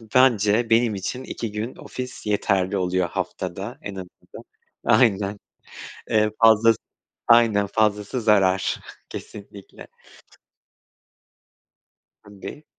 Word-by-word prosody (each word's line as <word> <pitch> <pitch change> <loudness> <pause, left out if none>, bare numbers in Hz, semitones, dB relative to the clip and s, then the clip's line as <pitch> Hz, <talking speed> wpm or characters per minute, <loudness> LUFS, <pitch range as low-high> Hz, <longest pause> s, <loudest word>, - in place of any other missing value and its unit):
bence 115 -3 +4
benim 115 -1 +3
için 125 +7 -5
2 115 -4 -5
gün 110 +4 -5
ofis 125 0 -8
yeterli 100 -2 0
oluyor. 90 -1 0
Haftada 100 +9 -5
en 100 - -7
azından 90 -1 -11 0.4
aynen, 105 -3 +2 0.7
eee, 110 0 +3
fazlası 115 0 +5 0.5
aynen 115 -4 +5
fazlası 105 +3 0
zarar 95 -4 +2 0.3
kesinlikle. 100 -1 -11 2.3
Tabii. 105 +9 -10
105 Hz, 90 wpm, -23 LUFS, 100-115 Hz, 2.3 s, fazlası